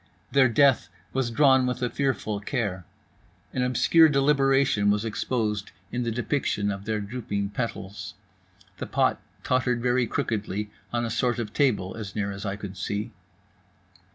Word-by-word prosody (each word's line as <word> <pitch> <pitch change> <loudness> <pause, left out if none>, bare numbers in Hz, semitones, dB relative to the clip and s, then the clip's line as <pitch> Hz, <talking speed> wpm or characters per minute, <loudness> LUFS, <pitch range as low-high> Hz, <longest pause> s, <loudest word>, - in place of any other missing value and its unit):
Their 135 -2 +5
death 135 -1 +4 0.2
was 130 -2 0
drawn 130 +1 +4
with 125 0 -2
a 125 - +1
fearful 120 -7 -1
care. 100 - -3 0.7
An 130 - -1
obscure 155 +6 +5
deliberation 135 -6 +3
was 105 +2 +1
exposed 105 -2 -2 0.2
in 125 - -2
the 120 - -1
depiction 115 -3 -1
of 100 0 -6
their 110 0 -1
drooping 100 -2 -3
petals. 105 -3 -5 0.6
The - - -4
pot - - +1 0.2
tottered 125 -1 +1
very 125 0 +1
crookedly 105 -2 -2 0.2
on 120 0 0
a 115 - -3
sort 120 +1 +1
of 110 -3 -4
table, 105 -10 +1
as 105 -3 -7
near 100 -1 -1
as 100 +1 -5
I 100 - -2
could 100 -2 -8
see. 100 +3 -3
115 Hz, 155 wpm, -26 LUFS, 105-130 Hz, 0.7 s, Their